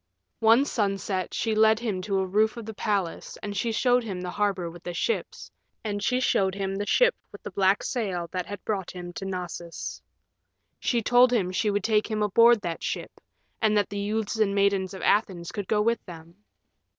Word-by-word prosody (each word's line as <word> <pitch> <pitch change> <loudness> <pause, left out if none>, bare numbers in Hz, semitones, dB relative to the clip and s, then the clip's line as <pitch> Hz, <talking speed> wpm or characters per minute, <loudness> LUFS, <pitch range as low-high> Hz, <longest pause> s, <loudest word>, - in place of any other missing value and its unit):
One 230 +5 +5
sunset 195 - -1
she 225 - -1
led 220 0 +5
him 215 -5 -2
to 195 +1 -1
a 190 - +1
roof 215 +4 +1
of 230 - -6
the 220 - -6
palace 200 -5 -2
and 205 -1 -4
she 230 +4 0
showed 245 +2 +2
him 195 -5 -5
the 180 0 -4
harbor 200 -4 0
with 170 +1 -10
the 175 0 -6
ships, 460 - -2 0.3
and 205 -2 -3
she 250 0 +2
showed 190 -6 +1
him 195 -1 -2
the 205 +1 -3
ship - - +4 0.2
with - - -12
the - - -6
black 195 +1 +2
sail 190 -9 -2
that 180 -2 -3
had 205 - -8
brought 195 -4 -2
him 175 -1 -8
to 195 - -6
Knossos. 175 -2 -5 0.8
She 235 -2 0
told 245 +2 +5
him 195 -7 +1
she 210 +3 0
would 205 -1 0
take 215 0 +2
him 215 -1 0
aboard 230 +2 +5
that 170 -4 -4
ship, - - -5 0.4
and 215 -1 +3
that 205 - +1
the 200 - -4
youths 215 +2 -2
and 200 -2 +2
maidens 200 -1 +1
of 190 - -8
Athens 185 -5 +1
could 205 -3 -5
go 210 -1 +2
with 230 +1 +1
them. 165 -1 -11
205 Hz, 205 wpm, -26 LUFS, 185-220 Hz, 0.8 s, One